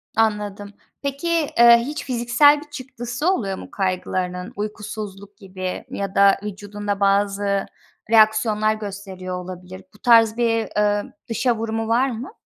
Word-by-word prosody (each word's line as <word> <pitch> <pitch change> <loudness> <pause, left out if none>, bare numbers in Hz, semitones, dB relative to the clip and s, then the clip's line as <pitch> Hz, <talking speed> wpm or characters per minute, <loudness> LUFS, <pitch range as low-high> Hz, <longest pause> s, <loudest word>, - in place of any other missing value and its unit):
Anladım. 210 -2 -1 0.3
Peki, 300 +3 -1
ııı, 235 0 +9
hiç 265 +6 -4
fiziksel 260 +4 +4
bir 300 - -14
çıktısı 260 +1 -4
oluyor 195 - -2
mu - - -10
kaygılarının? 185 -1 -2
Uykusuzluk 205 -1 -7
gibi 185 -2 -6
ya 195 -1 -5
da 200 0 +5
vücudunda 205 0 -5
bazı 200 0 +1 0.5
reaksiyonlar 215 -1 +4
gösteriyor 195 -3 -7
olabilir. 185 +1 -9
Bu 210 - -20
tarz 230 -2 +5
bir, 230 -2 +1 0.3
ımm, - - -13 0.2
dışa 235 +1 +1
vurumu 225 0 -3
var 245 +4 +2
mı? 240 - -6
210 Hz, 130 wpm, -22 LUFS, 195-235 Hz, 0.5 s, ııı